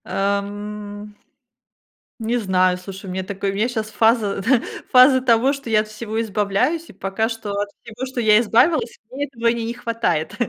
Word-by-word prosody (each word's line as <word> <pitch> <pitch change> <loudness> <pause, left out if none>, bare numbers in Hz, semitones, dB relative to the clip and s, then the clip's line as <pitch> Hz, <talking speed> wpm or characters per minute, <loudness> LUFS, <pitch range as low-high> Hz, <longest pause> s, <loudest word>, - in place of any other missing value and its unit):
Ам. 205 +1 -3 1.1
Не 230 +2 0
знаю, 185 -4 +2
слушай, 190 +1 -9
у - - -6
меня 190 +1 -3
такое, 195 0 -3
у - - -6
меня 215 +4 +1
щас 220 -3 -3
фаза 220 -3 +2
т 240 +2 +3 0.3
фаза 260 +1 +7
того, 250 +2 +3
что 275 -5 -6
я 215 - +5
от 215 - -1
всего 220 +1 -4
избавляюсь. 225 +10 0
И - - -12
пока 195 +3 -2
что, 225 -3 -6
от 200 0 -2
всего, 235 +2 -7
что 260 -2 -4
я 215 -1 +6
избавилась, 240 +4 +2
мне 275 +3 -3
этого 235 -5 -3
ни 230 0 +1
не 230 +1 -3
хватает. 230 -8 -2
220 Hz, 185 wpm, -21 LUFS, 200-240 Hz, 1.1 s, фаза